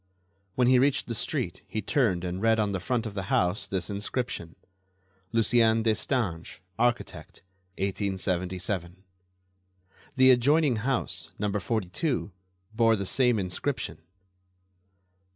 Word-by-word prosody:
When 125 - +3
he 130 0 +6
reached 140 +1 +2
the 120 - -4
street 110 - -2
he 110 - -3
turned 110 - +1
and 90 +1 -3
read 115 0 +3
on 105 -1 +1
the 95 - -2
front 115 +6 -1
of 110 - -5
the 95 -2 -4
house 90 +3 +1
this 95 -3 -2
inscription: 100 -4 -4 0.8
"Lucien 115 -1 +3
Destange, 110 -6 -1 0.2
architect, 120 -7 -2 0.3
1877." 95 -2 -2 1.1
The 130 -1 +7
adjoining 135 +1 +3
house, 105 -9 -1
No. 105 0 -1
42, 105 - -2 0.4
bore 115 0 +4
the 100 -2 -3
same 125 +3 +3
inscription. 90 -3 -3
105 Hz, 115 wpm, -27 LUFS, 95-120 Hz, 1.1 s, The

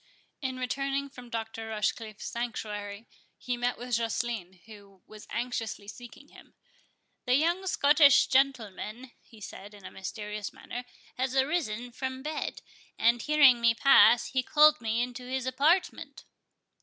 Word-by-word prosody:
In 260 -2 -3
returning 275 +2 -2
from 250 -3 -12
Dr. 225 -1 -5
Rochecliffe's 215 0 -3
sanctuary, 210 -3 -5 0.3
he 250 - -3
met 245 0 -1
with 245 +1 -8
Joceline, 225 -5 -3
who 200 -4 -16
was 215 -1 -13
anxiously 230 -4 -4
seeking 245 +6 -12
him. - - -18 0.7
"The 250 - +4
young 345 +6 +1
Scotch 290 -4 +5
gentleman," 250 -2 -1
he 225 - -18
said, 205 0 -10
in 200 - -15
a - - -8
mysterious 210 +1 -6
manner, 245 +1 -8 0.3
"has 260 +1 -2
arisen 265 -5 -1
from 260 +1 -5
bed, 305 0 -4 0.3
and, 235 +1 +3
hearing 285 -5 +5
me 230 -1 +4
pass, 240 -2 +6
he 260 - 0
called 300 +2 +5
me 225 +1 0
into 250 0 -7
his 260 -1 -2
apartment." 295 +8 0
245 Hz, 140 wpm, -28 LUFS, 220-265 Hz, 0.7 s, pass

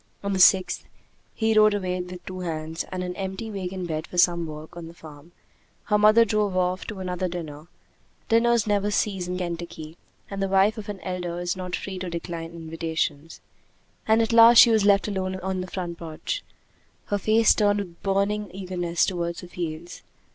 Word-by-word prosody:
On 200 0 -1
the 190 - -1
sixth, 185 0 +4 0.5
he 220 -1 +1
rode 215 -1 +6
away 185 -2 -2
with 180 0 -9
two 185 0 -7
hands 160 -2 -4
and 185 0 -3
an 180 0 -4
empty 195 +3 -5
wagon 185 -2 -4
bed 160 -1 -4
for 180 - -9
some 170 -1 +3
work 155 +1 -9
on 170 -1 -8
the 165 - -12
farm; 155 0 -13 0.5
her 210 - +2
mother 215 +2 +6
drove 210 -3 0
off 185 0 0
to 205 -4 -6
another 185 0 -2
dinner 160 -3 -7 0.6
dinners 235 -1 +3
never 205 -1 +1
cease 195 -3 -1
in 180 0 -3
Kentucky, 170 -2 -6 0.3
and 195 -1 -5
the 195 - +1
wife 195 +3 +3
of 210 0 -8
an 205 -2 -5
elder 180 -2 -4
is 175 0 -2
not 180 -1 -4
free 190 -2 -6
to 180 -1 -4
decline 170 -1 -5
invitations; 160 -2 -4 0.7
and 220 +1 +4
at 225 - -1
last 230 +1 +8
she 235 - +9
was 215 -2 +3
left 200 0 +4
alone 190 -2 -2
in 185 0 -3
the 185 - -6
front 175 -2 -5
porch, 165 - -5 0.6
her 205 - -1
face 220 +2 +4
turned 205 -1 +2
with 180 -4 -6
burning 200 +1 0
eagerness 180 -2 -1
toward 170 -2 -2
the 180 - -9
fields. 170 -1 -6
185 Hz, 190 wpm, -25 LUFS, 170-205 Hz, 0.7 s, she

